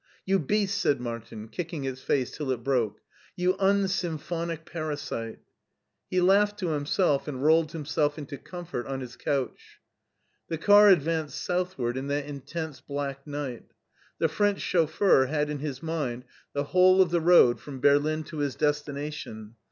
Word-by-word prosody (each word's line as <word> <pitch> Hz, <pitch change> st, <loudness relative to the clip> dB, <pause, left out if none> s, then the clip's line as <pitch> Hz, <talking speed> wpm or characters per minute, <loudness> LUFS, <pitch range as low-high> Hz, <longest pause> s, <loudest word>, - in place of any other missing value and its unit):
"You 195 Hz, 0 st, +2 dB
beast!" 200 Hz, +5 st, 0 dB
said 140 Hz, -, +2 dB
Martin, 115 Hz, -2 st, -6 dB
kicking 165 Hz, +2 st, -5 dB
its 130 Hz, -1 st, -4 dB
face 130 Hz, -3 st, 0 dB
till 150 Hz, -3 st, -4 dB
it 125 Hz, -3 st, -2 dB
broke 125 Hz, -5 st, 0 dB, 0.2 s
" -, -, -29 dB
you 180 Hz, +1 st, +2 dB
unsymphonic 175 Hz, -4 st, 0 dB
parasite! 145 Hz, -8 st, -4 dB, 0.4 s
*' -, -, -55 dB
He 185 Hz, -, +1 dB
laughed 205 Hz, +3 st, +4 dB
to 185 Hz, -5 st, -2 dB
himself 150 Hz, 0 st, +1 dB
and 135 Hz, -2 st, -4 dB
rolled 160 Hz, +1 st, +4 dB
himself 150 Hz, -1 st, -1 dB
into 145 Hz, -2 st, -7 dB
comfort 175 Hz, -8 st, -6 dB
on 135 Hz, -1 st, -3 dB
his 125 Hz, -1 st, -8 dB
couch. 135 Hz, -3 st, -3 dB, 0.7 s
The 165 Hz, -, -3 dB
car 205 Hz, +5 st, +7 dB
advanced 160 Hz, -3 st, +2 dB
southward 175 Hz, -9 st, -1 dB
in 135 Hz, +1 st, -4 dB
that 145 Hz, 0 st, -1 dB
intense 145 Hz, 0 st, -6 dB
black 140 Hz, 0 st, -5 dB
night. 145 Hz, -4 st, -5 dB, 0.5 s
The -, -, +2 dB
French 205 Hz, -1 st, +1 dB
chauffeur 160 Hz, -4 st, +3 dB
had 150 Hz, +1 st, -1 dB
in 150 Hz, -, -4 dB
his 145 Hz, 0 st, -5 dB
mind 140 Hz, -7 st, -3 dB, 0.3 s
the 140 Hz, -, 0 dB
whole 185 Hz, +5 st, +5 dB
of 175 Hz, -, -5 dB
the 170 Hz, -1 st, +2 dB
road 160 Hz, -8 st, +6 dB
from 140 Hz, -3 st, -8 dB
Berlin 145 Hz, +3 st, +3 dB
to 155 Hz, 0 st, -8 dB
his 145 Hz, -2 st, -1 dB
destination. 145 Hz, -6 st, -3 dB
150 Hz, 160 wpm, -27 LUFS, 135-175 Hz, 0.7 s, car